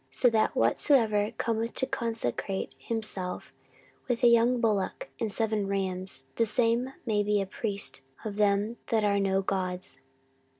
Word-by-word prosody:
so 245 - +3
that 220 -1 +3
whosoever 220 -7 +3
cometh 230 0 -1
to - - +2
consecrate 225 - -2
himself 210 -5 -4 0.5
with 245 -1 -1
a - - +8
young 235 +1 +5
bullock 225 - 0
and 220 -2 -1
seven 215 -1 0
rams, 190 -6 -2
the 230 - +4
same 235 +4 +1
may 215 -3 +2
be 205 0 +2
a 195 - 0
priest 200 - -4 0.2
of 210 -2 -3
them 205 +2 +2
that 220 -2 +2
are 200 -1 +3
no 195 0 +1
gods. 185 -1 -3
215 Hz, 145 wpm, -29 LUFS, 195-230 Hz, 0.5 s, a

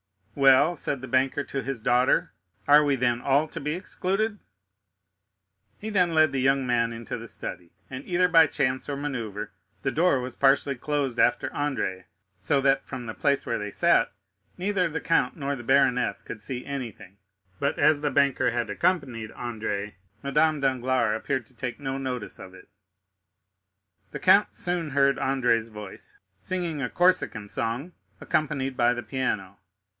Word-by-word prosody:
"Well," 135 +5 +5
said 140 -3 -3
the 130 - -7
banker 135 +2 +1
to 135 -1 -4
his 135 -2 -4
daughter, 125 +3 +2 0.4
"are 145 +1 +7
we 145 -2 +2
then 120 -2 0
all 140 +4 +2
to - - -6
be 150 +1 -2
excluded?" 195 +4 -2 1.4
He 220 +1 -6
then 180 -5 +2
led 155 -2 +5
the 135 - -1
young 135 0 +2
man 120 -2 +1
into 115 -1 -6
the - - -9
study, 85 -1 -7 0.2
and 130 +1 -7
either 180 0 +2
by 165 -3 +6
chance 130 -1 -1
or 140 - -2
manœuvre 115 -8 -4 0.3
the 135 - 0
door 165 -3 +3
was 125 0 -5
partially 140 +1 +2
closed 135 -3 -2
after 120 - +2
Andrea, 135 -11 -2 0.3
so 135 +9 +1
that 135 0 +2
from 130 -3 -6
the 110 - -5
place 140 +2 0
where - - -1
they 105 0 -4
sat - - +3 0.5
neither 185 -1 0
the 160 +1 -4
Count 165 -6 +1
nor 140 -2 -2
the 120 - -9
baroness 130 -1 +2
could 110 - -8
see 125 +3 -6
anything; 115 -8 -7 0.4
but 140 - 0
as 155 -2 +4
the 150 - +1
banker 140 -2 +2
had 120 -2 -2
accompanied 130 - -1
Andrea, 105 -4 -4 0.3
Madame 150 +2 +2
Danglars 130 -4 +1
appeared 120 +2 -2
to - - -19
take 120 +2 -5
no 135 -1 -3
notice 125 -4 -5
of 95 -1 -11
it. - - -16 1.4
The - - -6
count - - +4
soon 175 -4 -2
heard 140 0 +3
Andrea's 125 -4 +1
voice, 105 -3 -11 0.2
singing 175 -5 -3
a 125 - -2
Corsican 175 - +1
song, 120 - -3 0.3
accompanied 140 -4 -1
by 120 0 +3
the 120 - -5
piano. 105 -8 -3
135 Hz, 165 wpm, -26 LUFS, 120-145 Hz, 1.4 s, are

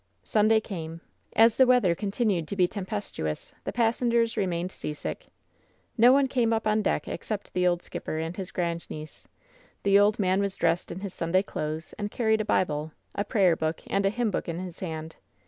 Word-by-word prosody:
Sunday 220 +1 +4
came. 165 -6 -6 0.3
As 225 0 +6
the 260 - +6
weather 245 -9 +4
continued 195 -3 -1
to 200 - -4
be 180 -2 +4
tem 195 0 -6
pestuous, 135 - -4
the - - -2
passengers 235 0 +2
remained 180 -3 -1
seasick. 150 -4 -5 0.7
No 240 +1 +7
one 275 0 +4
came 245 -3 +1
up 225 0 0
on 215 0 +2
deck 210 - 0
except 210 -2 -5
the 180 0 +2
old 175 -1 +1
skipper 155 - -5
and 160 +2 -3
his 190 -2 -6
^randniece. 170 -3 -4 0.6
The 200 0 +5
old 205 +1 +4
man 190 -1 +2
was 200 -1 -1
dressed 170 +1 0
in 185 - -6
his 200 -2 -5
Sunday 175 +3 +1
clothes, 155 -3 -4
and 205 0 -2
carried 220 -1 +1
a - - -3
Bible, 155 -6 0 0.2
a 200 - -1
prayer 195 -4 +3
book 160 0 -2
and 200 - 0
a 195 - +3
hymn 230 +1 -1
book 180 - -3
in 165 - -3
his 180 -1 -7
hand. 160 -3 -5
195 Hz, 195 wpm, -27 LUFS, 170-220 Hz, 0.7 s, No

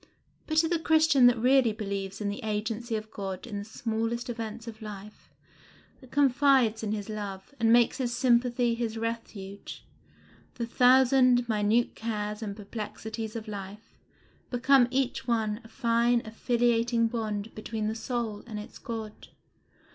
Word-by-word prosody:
But 315 - -2
to 325 +1 +5
the 340 0 0
Christian 315 -5 +5
that 245 0 +4
really 250 0 +4
believes 200 -2 -4
in 205 -1 -2
the 200 - -5
agency 220 +2 -2
of 215 0 -5
God 195 -3 -5
in 210 -4 -5
the - - -5
smallest 225 +2 -3
events 230 0 -6
of 225 0 -9
life, 210 -1 -10 0.7
that 260 - -16
confides 270 -5 +3
in 215 -2 -2
his 210 -2 -3
love, 205 +1 -6
and 225 0 +3
makes 235 0 +4
his 245 -2 -1
sympathy 240 0 +2
his 230 -1 -3
refuge, 225 -4 -6 0.7
the 235 - -3
thousand 250 0 +5
minute 220 +2 +2
cares 210 -1 -4
and 205 -3 -4
perplexities 220 +1 -6
of 225 -1 -6
life 205 +1 -9 0.5
become 250 +1 +4
each 265 0 -1
one 220 -2 0
a - - -13
fine 235 0 +1
affiliating 235 +1 +1
bond 220 -2 -3
between 215 0 -4
the 215 - -1
soul 225 -2 -3
and 220 -3 -6
its 210 - -9
God. 225 -4 -7
230 Hz, 150 wpm, -28 LUFS, 215-245 Hz, 0.7 s, to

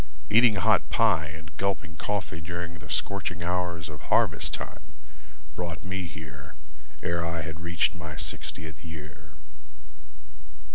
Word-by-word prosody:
Eating 115 0 +7
hot 105 +1 +4
pie 100 -9 +4
and 80 +2 -9
gulping 95 -4 -1
coffee 95 -5 -2
During 85 0 -4
the 75 - -10
scorching 90 -3 0
hours 90 -2 0
of 75 -3 -8
harvest - - +4
time - - -6 0.7
Brought 85 -1 -3
me 95 -1 -2
here 75 -4 -9 0.5
ere 85 -1 +1
I 85 -1 -1
had 80 0 -5
reached 85 -1 +2
my 80 -3 -6
sixtieth 80 +1 -2
year. 75 -2 -9
85 Hz, 130 wpm, -28 LUFS, 80-90 Hz, 0.7 s, Eating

